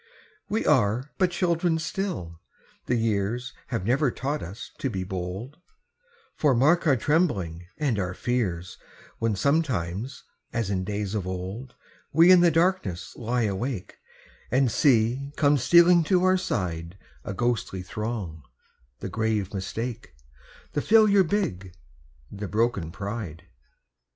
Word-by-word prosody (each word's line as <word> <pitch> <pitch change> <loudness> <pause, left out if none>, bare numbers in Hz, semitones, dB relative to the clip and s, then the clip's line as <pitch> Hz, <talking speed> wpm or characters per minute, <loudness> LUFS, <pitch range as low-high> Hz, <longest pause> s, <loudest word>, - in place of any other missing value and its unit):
We 220 +2 -1
are 120 +5 +2
but 185 -2 +4
children 170 -1 +1
still, 160 - -4 0.5
the 125 - +2
years 115 +2 -1
Have 115 -7 -3
never 135 +5 +2
taught 140 +5 -3
us 100 +7 -8
to 135 - -1
be 95 -6 -3
bold, 95 - -5 0.8
For 145 -4 +3
mark 155 +8 +3
our 140 - +5
trembling 100 - 0
and 135 -9 0
our 90 -1 -2
fears 95 -9 -2 0.4
When 115 -2 +1
sometimes, 125 - -1 0.3
as 115 -4 -1
in 95 -1 0
days 100 +1 -3
of 100 -4 -2
old, 95 +8 -6 0.4
We 165 +4 +7
in 185 - +8
the 175 0 +6
darkness 165 - 0
lie 120 +1 -1
awake, 105 +1 -3 0.5
And 130 -1 +2
see 125 +2 +2
come 145 -1 +4
stealing 170 +6 +6
to 180 +2 +3
our 185 0 +5
side 90 - -3 0.3
A 100 - -5
ghostly 120 -6 -1
throng 100 -5 -4 0.6
the - - -3
grave 110 -4 -1
Mistake, 110 - -5 0.6
The 145 - 0
Failure 210 -1 +5
big, 100 - -2 0.6
the 100 0 -5
broken 105 -5 0
Pride. 100 -4 -5
115 Hz, 130 wpm, -26 LUFS, 95-150 Hz, 0.8 s, in